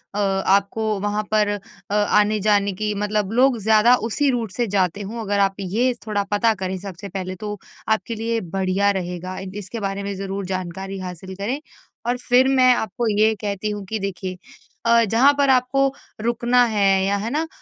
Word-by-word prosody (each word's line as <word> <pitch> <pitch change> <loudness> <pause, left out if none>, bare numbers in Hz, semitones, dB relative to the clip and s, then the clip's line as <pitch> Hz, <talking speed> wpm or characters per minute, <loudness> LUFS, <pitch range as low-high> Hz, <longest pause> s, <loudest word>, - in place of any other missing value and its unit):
अ, - - -1
आपको 200 +2 +1
वहाँ 205 +1 -1
पर 215 -1 +3
अ, 205 0 -7
आने-जाने 210 -1 +3
की 210 +2 -2
मतलब 210 0 -1
लोग 255 +1 +4
ज़्यादा 220 +3 +5
उसी 285 +5 +1
रूट 230 -5 -2
से 240 +4 -1
जाते 190 -1 0
हों। 220 +4 -5
अगर 205 -2 -1
आप 195 -1 +2
ये 220 +7 +1
थोड़ा 205 -2 0
पता 220 +2 +3
करें 185 0 -2
सबसे 195 +1 -8
पहले 185 0 -5
तो 210 +2 -5 0.3
आपके 220 +2 0
लिए 225 +1 -1 0.2
बढ़िया 195 +1 +2
रहेगा 185 -1 -4
इ 190 - -7
इसके 210 +3 -6
बारे 195 -1 -3
में 200 0 -3
ज़रूर 195 0 -4
जानकारी 190 +1 -4
हासिल 185 +1 -7
करें। 215 +9 -3 0.5
और 245 +1 +1
फिर 250 +1 +3
मैं 255 -2 +5
आपको 230 +2 -2
ये 220 +1 +5
कहती 205 0 -2
हूँ 205 -1 -5
कि 220 -1 -2
देखिए 185 -1 -4 0.5
अ, 230 0 +5
जहाँ 230 +6 +5
पर 280 -1 +3
आपको 265 +1 +3 0.3
रुकना 240 +2 +3
है, 195 -4 +2
या 200 +1 +1
है 210 +3 -3
ना? 315 +4 -1
205 Hz, 185 wpm, -22 LUFS, 195-230 Hz, 0.5 s, ज़्यादा